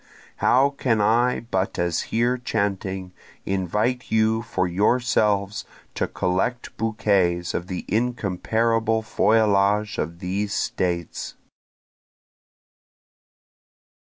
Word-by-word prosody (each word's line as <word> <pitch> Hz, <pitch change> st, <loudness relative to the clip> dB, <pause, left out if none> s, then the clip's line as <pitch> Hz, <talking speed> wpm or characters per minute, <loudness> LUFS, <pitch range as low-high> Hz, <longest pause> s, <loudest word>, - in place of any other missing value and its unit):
How 135 Hz, +2 st, +4 dB
can 125 Hz, -5 st, 0 dB
I 120 Hz, +4 st, +2 dB
but 95 Hz, -5 st, -2 dB
as 85 Hz, -2 st, 0 dB
here 120 Hz, +2 st, +2 dB
chanting, 95 Hz, -6 st, -2 dB, 0.3 s
invite 105 Hz, +7 st, -1 dB
you 110 Hz, 0 st, +2 dB
for 95 Hz, -4 st, -1 dB
yourself 105 Hz, 0 st, +1 dB, 0.3 s
to -, -, -1 dB
collect 95 Hz, +7 st, -2 dB
bouquets 100 Hz, -6 st, +1 dB
of 90 Hz, -, -3 dB
the 90 Hz, -1 st, -5 dB
incomparable 115 Hz, +1 st, 0 dB
feuillage 105 Hz, -1 st, +2 dB
of 85 Hz, +2 st, -3 dB
these 100 Hz, +3 st, -2 dB
States? 85 Hz, -2 st, -2 dB
105 Hz, 90 wpm, -23 LUFS, 95-115 Hz, 0.3 s, How